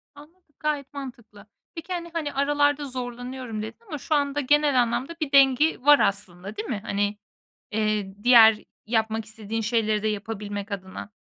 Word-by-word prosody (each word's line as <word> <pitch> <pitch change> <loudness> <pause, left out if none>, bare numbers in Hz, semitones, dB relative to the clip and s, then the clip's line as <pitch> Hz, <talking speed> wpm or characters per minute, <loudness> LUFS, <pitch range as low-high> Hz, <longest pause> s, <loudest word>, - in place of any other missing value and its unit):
Anladım. 300 +1 -18
Gayet 290 -2 -2
mantıklı. 235 -7 -10 0.3
Peki 335 +3 -6
hani 340 -1 -4
hani 310 -3 -3
aralarda 290 +1 +1
zorlanıyorum 245 -2 -6
dedin 220 - -7
ama 300 - -5
şu 305 +3 -1
anda 285 0 0
genel 290 -1 +3
anlamda 255 +7 -2
bir 290 -2 -2
dengi 275 +1 +4
var 290 -2 +8
aslında, 200 -1 -2
değil 215 - -5
mi? 215 -5 -2
Hani, 205 +1 -1 0.5
eee, 210 -2 -1
diğer 225 -3 +7 0.2
yapmak 220 -1 0
istediğin 220 +1 -5
şeyleri 215 -1 0
de - - +1
yapabilmek 205 -1 -4
adına. 190 +1 -6
240 Hz, 155 wpm, -25 LUFS, 215-290 Hz, 0.5 s, var